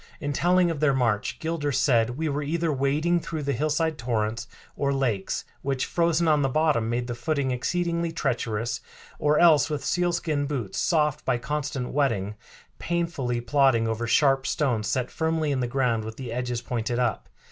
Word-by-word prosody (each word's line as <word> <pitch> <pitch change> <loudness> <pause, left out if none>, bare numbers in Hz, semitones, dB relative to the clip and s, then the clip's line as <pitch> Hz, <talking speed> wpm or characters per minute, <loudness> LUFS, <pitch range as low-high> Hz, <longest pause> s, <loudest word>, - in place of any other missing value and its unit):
In 145 -1 -2
telling 175 +3 +3
of 160 - -4
their 140 -2 +3
march 115 -5 0
Gilder 160 -3 -2
said, 120 -2 +2
"We 160 +1 -1
were 145 0 -1
either 160 +2 -1
wading 150 +6 +1
through 160 -2 -5
the 140 0 0
hillside 155 +3 0
torrents 115 -1 -2 0.3
or 140 -1 0
lakes, 120 -8 -1 0.2
which, 135 -1 -1
frozen 170 -1 +1
on 150 -2 +4
the 135 - +1
bottom, 145 -6 +1
made 120 +1 -1
the 120 - -4
footing 135 +2 -1
exceedingly 170 +6 -1
treacherous, 120 -6 -2 0.4
or 150 0 +3
else 160 -4 +5
with 145 -3 -3
sealskin 170 -5 0
boots, 125 -9 -3
soft 150 -4 +1
by - - +1
constant 135 0 -3
wetting, 115 -8 0 0.5
painfully 165 -9 -1
plodding 120 -2 +3
over 115 +1 -2
sharp 135 +2 +3
stones 120 -8 0
set 130 -1 -1
firmly 160 -2 0
in 135 - 0
the 125 - 0
ground 120 -3 0
with 110 0 -7
the 125 -3 -6
edges 125 -1 -3
pointed 120 0 -2
up. 120 -4 -1
140 Hz, 175 wpm, -26 LUFS, 120-155 Hz, 0.5 s, else